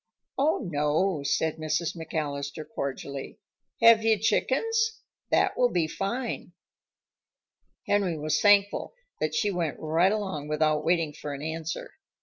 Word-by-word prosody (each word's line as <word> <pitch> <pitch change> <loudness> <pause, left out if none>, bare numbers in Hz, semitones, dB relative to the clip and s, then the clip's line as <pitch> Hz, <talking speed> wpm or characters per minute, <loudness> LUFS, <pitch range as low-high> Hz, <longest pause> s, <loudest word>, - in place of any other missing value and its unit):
"Oh, 275 -6 +1
no," 150 +2 +1
said 155 +3 0
Mrs. 155 +2 -1
McAllister 155 -2 -4
cordially. 140 -1 -5 0.5
"Have 230 -1 +8
you 225 -1 +4
chickens? 445 - +1 0.3
That - - +2
will 245 - +3
be 175 -7 +1
fine." 235 +9 -4 1.3
Henry 195 -5 +1
was 155 0 0
thankful 205 - +3 0.2
that 155 0 -1
she 205 +6 +1
went 170 -5 -2
right 165 +5 +2
along 190 -9 -3
without 155 0 +1
waiting 165 -2 +1
for 145 -1 -6
an 140 - -8
answer. 165 - -4
165 Hz, 130 wpm, -27 LUFS, 150-205 Hz, 1.3 s, Have